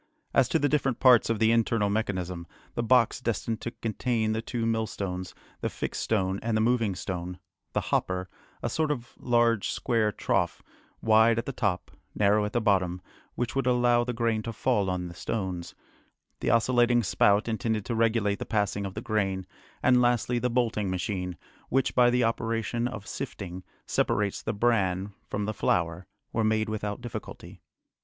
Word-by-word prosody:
As - - +4
to - - +3
the 145 - +2
different 135 -4 0
parts 125 -4 +6
of 115 - +1
the 110 +1 +3
internal 115 -2 +2
mechanism, 90 -5 -2 0.3
the - - -1
box 120 0 +3
destined 115 -1 -2
to - - -3
contain 115 -1 -1
the 110 +1 -1
two 115 0 -3
millstones, 100 -5 -2 0.2
the - - -1
fixed - - -4
stone 95 -3 0
and 115 -1 0
the - - +2
moving 115 -3 +2
stone, 90 0 -5 0.4
the - - +1
hopper, 90 0 0 0.4
a - - 0
sort 155 -1 0
of 120 -5 -3
large 120 -3 +2
square 115 -4 +1
trough, - - -1 0.4
wide 110 +1 +5
at 115 - -1
the - - -3
top, 100 -8 -1 0.2
narrow 105 +1 +3
at 105 - -5
the 120 - +2
bottom, 95 -5 +1 0.4
which 120 0 -2
would 135 -1 0
allow 120 -1 +4
the 125 - -2
grain 115 -2 0
to 115 - -5
fall 105 -3 +1
on 90 -1 -2
the 85 - -8
stones, 90 -1 -4 0.6
the - - -1
oscillating 120 0 +3
spout 100 +2 +3
intended 110 -1 -1
to 120 - -2
regulate 110 -3 +1
the - - -2
passing 100 -2 0
of 95 - -9
the 110 - -4
grain, 95 -4 -1 0.4
and 125 -1 +5
lastly 120 0 +2
the 125 +1 0
bolting 115 -5 0
machine, 90 -1 -3 0.3
which 135 0 +1
by 125 -1 +5
the 125 0 +2
operation 115 +1 -1
of 110 -4 -7
sifting, 95 -1 -6 0.2
separates 100 -1 0
the 110 - -2
bran 100 -4 +1
from 105 0 -2
the 110 - -2
flour, 85 -3 0 0.3
were 115 - +1
made 110 0 +1
without 105 0 -3
difficulty. 120 -2 -8
110 Hz, 175 wpm, -28 LUFS, 100-120 Hz, 0.6 s, parts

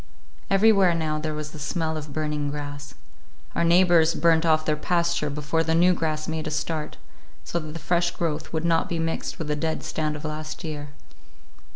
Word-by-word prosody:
Everywhere 195 -3 +5
now 155 -2 -1
there 155 0 -3
was 150 0 -5
the 155 - -10
smell 160 +1 -2
of 155 -1 -6
burning 150 -1 -2
grass. 145 -1 -6 0.6
Our - - +1
neighbors 170 -1 +5
burned 165 -1 +3
off 155 -1 +3
their 155 - +2
pasture 170 -1 0
before 150 +3 -1
the 160 0 +1
new 180 +2 +5
grass 155 -2 -2
made 160 -1 -3
a - - -1
start, 155 0 -3 0.5
so 170 - -2
that 155 -2 -7
the - - -5
fresh 170 +2 +1
growth 160 -3 -3
would 160 0 -1
not 165 -1 +2
be 170 - -1
mixed 165 0 -2
with 160 - -4
the 150 - 0
dead 160 +2 -2
stand 155 -1 -2
of 150 - -7
last 155 +3 -5
year. 150 -2 -5
160 Hz, 195 wpm, -25 LUFS, 150-170 Hz, 0.6 s, Everywhere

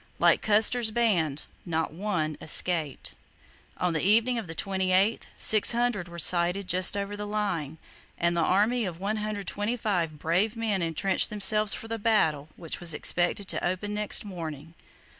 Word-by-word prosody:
Like - - +3
Custer's 220 +2 +4
band, 185 -11 0 0.2
not 160 -3 -3
one 170 -5 -2
escaped. 160 -2 0 0.6
On 180 -1 -1
the 160 - -1
evening 230 +5 +3
of 215 - -8
the 165 - -7
28th, 190 +3 0
600 225 -2 +3
were 170 0 -11
sighted 175 +3 +2
just 185 +2 +4
over 200 +1 -4
the 205 0 -6
line, 180 -8 -3 0.4
and 170 0 0
the 170 - +1
army 210 +8 +1
of 175 -3 -6
125 205 -3 -3
brave 180 +9 0
men 220 -4 -1
entrenched 170 +3 0
themselves 210 0 +2
for 225 - -8
the 225 0 -4
battle 160 -10 +1
which 165 -2 -5
was 170 -3 +1
expected 175 +5 0
to - - -1
open 185 +4 -2
next 210 0 0
morning. 165 -5 -8
195 Hz, 150 wpm, -27 LUFS, 170-210 Hz, 0.6 s, Custer's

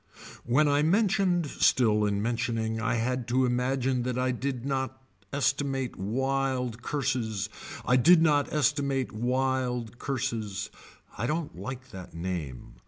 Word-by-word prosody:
When 135 +6 +3
I 145 0 +3
mentioned 185 0 +2
still 110 -6 +3
in 100 0 0
mentioning 115 -1 -1
I 115 - +1
had 120 +1 -1
to 130 +2 +2
imagine 125 +1 0
that 125 0 -2
I 130 0 +1
did 130 0 -3
not 130 -1 -2 0.3
estimate 135 -1 0
wild 125 +2 -1
curses. 120 -8 -1 0.4
I 125 - +4
did 170 +7 +7
not 150 -3 +3
estimate 140 -3 +1
wild 125 0 -1
curses. 115 -7 -3 0.5
I 115 - 0
don't 155 +2 -2
like 130 0 -7
that 90 -3 -10
name. 85 -9 -5
130 Hz, 130 wpm, -28 LUFS, 115-135 Hz, 0.5 s, did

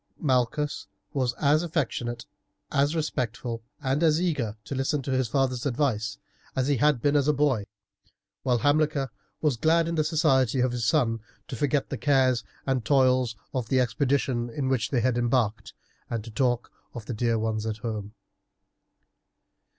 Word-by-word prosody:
Malchus 130 -2 0 0.3
was 130 -3 0
as 150 +1 +3
affectionate, 120 -8 -2 0.5
as 145 +3 +2
respectful, 120 -6 -2 0.2
and 135 +3 +1
as 160 -1 +4
eager 140 - -1
to - - -6
listen 135 +2 0
to 135 - -3
his 130 -1 +1
father's 130 0 0
advice, 115 -6 0 0.4
as 130 0 +1
he 145 -2 +2
had 145 -1 +2
been 145 0 +3
as 145 -1 +3
a 150 - +4
boy, 135 -8 +1 0.7
while 125 -2 +2
Hamilcar 145 0 +1 0.3
was 150 -6 +1
glad 165 +5 +3
in 170 - -2
the 155 -2 +2
society 140 -5 +2
of 125 0 +2
his 120 -2 -2
son 115 -3 +2 0.3
to 130 - -5
forget 145 +3 0
the - - -3
cares 130 -4 +3 0.2
and 130 -3 0
toils 130 -3 +3 0.2
of 125 -4 -2
the 130 - +3
expedition 125 0 +1
in 130 +3 -2
which 125 -4 0
they 125 -4 +1
had 120 0 +1
embarked 115 -3 0 0.4
and 115 -2 -3
to 115 - -9
talk 120 +1 0 0.2
of 115 -3 -7
the 120 - -4
dear 115 +1 +1
ones 110 0 -1
at 110 -1 -2
home. 105 -1 -5
130 Hz, 165 wpm, -27 LUFS, 115-145 Hz, 0.7 s, as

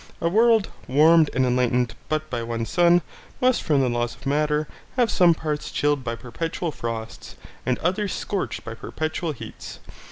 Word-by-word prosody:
A 170 - +1
world, 225 +1 +4 0.2
warmed 155 +3 +5
and 130 0 +1
enlightened 125 -1 +1 0.2
but 155 0 -1
by 120 -2 -2
one 115 0 -3
sun, 175 +4 +4 0.4
must 255 -1 +3
from 145 -4 +2
the 130 - +2
laws 120 -1 -1
of - - -17
matter 150 +2 +1 0.3
have 245 -4 +2
some 175 -3 +5
parts 150 -2 -3
chilled 145 -2 0
by 115 -1 -3
perpetual 165 +8 -4
frosts 115 -4 -6 0.3
and 125 - +2
others 190 +3 -1
scorched 200 -2 -3
by 115 - -5
perpetual 155 +7 -3
heats. 140 - -9
150 Hz, 165 wpm, -24 LUFS, 125-170 Hz, 0.4 s, warmed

